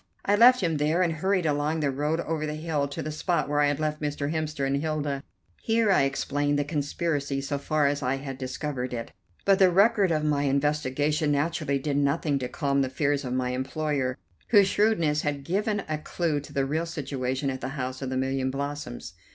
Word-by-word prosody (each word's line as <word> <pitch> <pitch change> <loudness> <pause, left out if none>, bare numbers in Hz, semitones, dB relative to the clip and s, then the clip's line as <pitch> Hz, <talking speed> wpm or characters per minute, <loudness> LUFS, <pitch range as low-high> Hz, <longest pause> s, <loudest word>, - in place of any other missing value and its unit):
I 205 - +4
left 245 +3 +7
him 165 -4 +1
there, 155 +5 +2
and 170 -2 +1
hurried 185 +2 0
along 150 +1 0
the 140 -2 +1
road 150 +4 -1
over 155 -2 -2
the 150 - -3
hill 155 -2 -1
to 155 +3 -5
the 155 - -4
spot 170 +3 0
where 145 +1 0
I 145 - +4
had 145 0 0
left 155 0 -2
Mr. 145 0 -2
Hemster 155 -3 -2
and 135 +1 +1
Hilda. 150 -2 -2 0.4
Here 225 -2 +2
I 160 - +4
explained 145 +1 0
the 145 - +1
conspiracy 145 -1 -2
so 140 +1 -3
far 150 +1 +1
as 140 +1 +1
I 130 0 0
had 135 -1 -6
discovered 130 -1 -3
it, 115 - -6 0.3
but 195 0 +4
the 190 -1 +7
record 200 +2 +4
of 155 -1 +1
my 145 -1 +1
investigation 145 +2 +1
naturally 145 -1 0
did 140 +1 -1
nothing 140 0 +1
to 125 -1 -4
calm 140 -3 0
the 130 - 0
fears 140 +1 0
of 125 -1 -3
my 125 -1 0
employer, 130 0 -2 0.3
whose 205 -4 +6
shrewdness 180 -8 +2
had 145 -2 -2
given 205 - -1
a 155 -1 -2
clue 155 -1 -1
to 145 - -11
the 135 -1 0
real 160 +5 -1
situation 135 -4 -2
at 130 0 -6
the - - -3
House 130 0 -4
of 135 - -3
the 130 - -2
Million 130 0 0
Blossoms. 140 - -5
145 Hz, 210 wpm, -27 LUFS, 140-160 Hz, 0.4 s, left